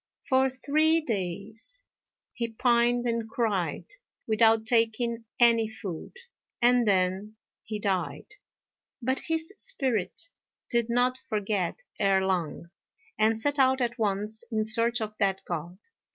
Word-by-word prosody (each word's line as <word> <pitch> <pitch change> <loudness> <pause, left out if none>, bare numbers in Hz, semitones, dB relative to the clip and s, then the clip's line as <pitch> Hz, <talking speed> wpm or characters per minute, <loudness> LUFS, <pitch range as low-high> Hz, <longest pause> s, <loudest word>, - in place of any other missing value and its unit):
For 265 0 +3
three 310 +5 +2
days 220 - -4 0.5
he 235 -3 -2
pined 240 +1 +2
and 230 -2 -1
cried, 210 -7 -1 0.4
without 220 0 +4
taking 230 0 +1
any 230 -2 +5
food, 200 - -7 0.4
and 245 -1 +4
then 190 +2 +1 0.3
he 215 -1 -5
died. 195 -4 -2 0.7
But 260 +2 0
his 325 +3 -1
spirit 265 - -2 0.4
did 235 -1 +2
not 250 +2 +2
forget 210 - -2 0.2
Erh 195 -1 +3
Lang, 170 -2 -2 0.5
and 220 +1 +3
set 285 +5 0
out 265 0 +4
at 245 0 -1
once 210 +1 -1
in 215 -1 0
search 230 +2 +2
of 215 -1 -3
that 195 -2 0
God. 175 +1 -5
225 Hz, 125 wpm, -28 LUFS, 205-245 Hz, 0.7 s, any